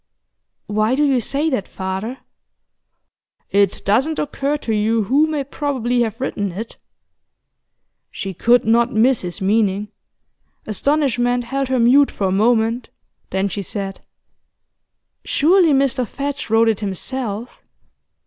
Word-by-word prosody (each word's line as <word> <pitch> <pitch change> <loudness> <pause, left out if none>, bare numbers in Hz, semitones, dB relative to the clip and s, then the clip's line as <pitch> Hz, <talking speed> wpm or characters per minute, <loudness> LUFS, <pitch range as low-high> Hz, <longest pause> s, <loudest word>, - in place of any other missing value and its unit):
'Why 215 +4 +1
do 295 - +2
you 275 -3 +3
say 280 +6 -1
that, 255 -7 -2
father?' 190 +6 -4 1.3
'It 200 -1 +1
doesn't 265 +11 +2
occur 285 0 -1
to 230 -6 -3
you 220 +1 +1
who 280 +9 +3
may 305 -3 -2
probably 260 -4 -1
have 225 0 -2
written 205 -7 -2
it?' 220 +5 -7 1.3
She 195 0 -5
could 240 +7 +3
not 235 +2 +3
miss 245 +2 +3
his 180 0 -6
meaning; 205 0 +1 0.8
astonishment 245 0 0
held 270 +3 -2
her 260 0 0
mute 255 +4 +5
for 200 - -3
a 185 - +1
moment, 225 +3 +1 0.4
then 190 +1 0
she 200 +1 -4
said: 195 0 -5 1.2
'Surely 340 +2 +3
Mr 270 -3 +1
Fadge 280 +2 -4
wrote 225 +1 +4
it 220 - 0
himself? 220 +3 -4
235 Hz, 130 wpm, -19 LUFS, 210-270 Hz, 1.3 s, mute